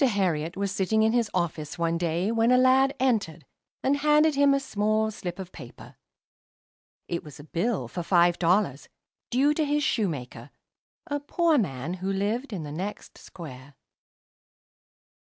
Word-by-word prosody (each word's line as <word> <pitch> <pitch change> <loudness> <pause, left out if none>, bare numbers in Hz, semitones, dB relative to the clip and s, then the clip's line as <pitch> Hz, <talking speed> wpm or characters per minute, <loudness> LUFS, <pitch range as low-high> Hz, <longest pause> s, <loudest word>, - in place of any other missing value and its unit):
Herriot 180 - 0
was 200 -1 -1
sitting 210 +2 +1
in 220 - +3
his 235 -3 +1
office, 165 -2 -3
one 170 0 0
day, 175 +4 0
when 230 0 +2
a 250 - +5
lad 265 +2 +4
entered, 210 -11 0 0.4
and 275 +2 +2
handed 300 +1 +4
him 280 0 +4
a - - +1
small 215 -3 0
slip 175 -4 -6
of 185 -2 -8
paper. 125 -7 -12 1.1
It 170 - -3
was 150 -2 -12
a - - -10
bill 175 +8 -2
for 175 - -5
five 175 0 +3
dollars, 175 -5 +1 0.4
due 275 +4 +3
to 310 - 0
his 295 0 0
shoemaker, 170 - -2 0.6
a 290 0 -2
poor 320 +1 +2
man 150 - -3
who 185 +1 -3
lived 215 +7 -2
in 185 -6 -4
the 145 - -7
next 190 +7 -6
square. 140 -5 -11
200 Hz, 155 wpm, -26 LUFS, 170-250 Hz, 1.1 s, a